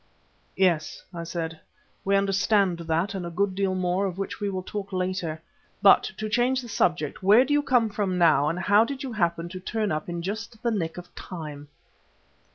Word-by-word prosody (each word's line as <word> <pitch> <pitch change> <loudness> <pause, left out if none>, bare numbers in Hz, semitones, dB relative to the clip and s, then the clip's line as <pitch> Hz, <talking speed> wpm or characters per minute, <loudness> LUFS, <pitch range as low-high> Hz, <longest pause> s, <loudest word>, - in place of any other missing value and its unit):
"Yes," 175 -5 +1
I 170 -1 -5
said, 165 -1 -4 0.4
"we 200 0 +2
understand 195 -2 +2
that, 170 +4 -1
and 190 -2 -4
a 170 - -4
good 190 +3 0
deal 190 -1 0
more 185 +2 0
of 180 -1 -6
which 195 -1 -4
we 205 - -1
will 185 -1 -3
talk 200 +1 -6
later. 185 -4 -2 0.4
But, 200 -1 +5
to 215 - -3
change 245 +4 +1
the 240 - -9
subject, 170 -8 0
where 210 +7 +6
do 290 - 0
you 290 - +4
come 250 -5 +3
from 200 -3 -1
now, 155 -4 +4
and 165 - -2
how 205 +4 +4
did 275 +3 -5
you 260 -3 -5
happen 170 -4 0
to 185 +1 -7
turn 215 +3 -2
up 155 +2 -3
just 220 +6 -5
in - - -21
the 235 - +1
nick 170 -7 -2
of 180 0 -10
time?" 150 -5 -8
190 Hz, 200 wpm, -26 LUFS, 170-210 Hz, 0.4 s, where